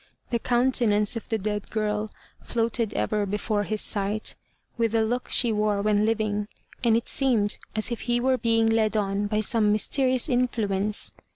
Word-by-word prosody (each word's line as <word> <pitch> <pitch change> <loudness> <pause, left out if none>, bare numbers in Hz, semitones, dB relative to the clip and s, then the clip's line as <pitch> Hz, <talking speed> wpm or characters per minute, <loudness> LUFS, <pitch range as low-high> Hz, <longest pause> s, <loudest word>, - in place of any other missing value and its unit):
The 235 - +1
countenance 240 -4 +1
of 230 - -7
the 225 - 0
dead 210 0 -4
girl 215 0 -2 0.3
floated 230 -2 -1
ever 210 -1 -1
before 205 +1 -1
his 215 0 -1
sight, 205 +1 -1 0.4
with 230 -2 0
the 225 -1 +3
look 245 +3 -3
she 240 -3 +3
wore 210 -1 0
when 210 0 +2
living, 210 -2 -1 0.4
and 230 -2 +4
it 235 - -3
seemed 235 -7 +2 0.2
as 215 +3 +2
if 235 - -4
he 240 0 0
were 260 +1 +1
being 225 -1 +2
led 220 -1 +1
on 200 0 -1
by 215 +1 0
some 215 -1 +2
mysterious 255 +5 +2
influence. 215 -6 0
220 Hz, 170 wpm, -25 LUFS, 210-235 Hz, 0.4 s, and